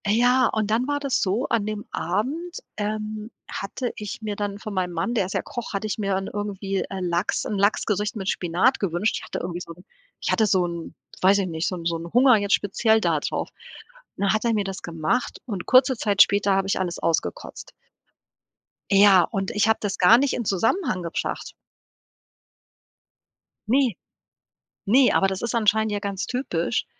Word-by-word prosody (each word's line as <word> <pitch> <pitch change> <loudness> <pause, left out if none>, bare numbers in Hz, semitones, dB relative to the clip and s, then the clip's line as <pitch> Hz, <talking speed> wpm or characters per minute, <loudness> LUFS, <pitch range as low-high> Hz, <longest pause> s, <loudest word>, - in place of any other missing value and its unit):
Äh, 205 - +2
ja, 245 +2 +4
und 215 -1 -1
dann 235 +4 +1
war 290 0 0
das 275 -2 0
so: 210 +8 0
An 220 -3 +1
dem 210 -1 -4
Abend, 265 - -2 0.2
ähm, 215 +1 -4 0.2
hatte 235 +5 -4
ich 210 +1 -6
mir 210 -1 -3
dann 205 -1 -3
von 215 0 -7
meinem 180 -2 -1
Mann, 170 +8 -1
der 210 -6 +1
ist 190 - -6
ja - - 0
Koch 240 -3 -7
hatte 200 +2 -2
ich 215 +1 -2
mir 200 -3 -1 0.2
irgendwie, 200 -1 -3
äh, 195 -1 -5
Lachs 175 -1 -1
'n 210 - -2
Lachsgericht 210 +2 +1
mit 195 -3 -3
Spinat 180 +9 +1
gewünscht. 195 +2 0
Ich - - -8
hatte - - -5
irgendwie 175 0 -4
so 170 - -8
'n 175 +2 -18 0.4
ich - - -2
hatte 220 - +3
so 185 -3 +2
'n, 170 -1 -6 0.3
weiß 195 +2 +5
ich 195 - -1
nicht 160 -1 -2
so 185 - -2
'n 170 -2 -8
so 170 0 0
'n 170 +1 -8
Hunger 250 -1 +6
jetzt 200 0 0
speziell 220 +2 +2
da - - +1
drauf. - - -3 0.7
Und - - -7
dann 200 - +3
hat 215 - 0
er 230 - +2
mir 210 -2 +1
das 195 -1 -6
gemacht 165 +8 -2
und 200 -7 -5
kurze 260 +1 +5
Zeit 205 -3 +2
später 200 0 +4
habe 195 0 0
ich 195 - 0
alles 180 -2 -2
ausgekotzt. 165 - -3 1.2
Ja, 195 -2 +7
und 195 -4 -3
ich 210 +1 +2
habe 220 - +3
das 205 -2 -2
gar 190 +6 +7
nicht 275 +2 +1
in 240 - -2
Zusammenhang 205 - 0
gebracht. 170 -1 -4 2.1
Ne, 255 0 +3 0.9
ne, 250 +6 +5
aber 195 - +4
das 190 -1 -3
ist 235 - -2
anscheinend 220 -1 +2
ja 205 - 0
ganz 200 -2 -4
typisch, 240 -6 -1
205 Hz, 195 wpm, -24 LUFS, 190-225 Hz, 2.1 s, Ja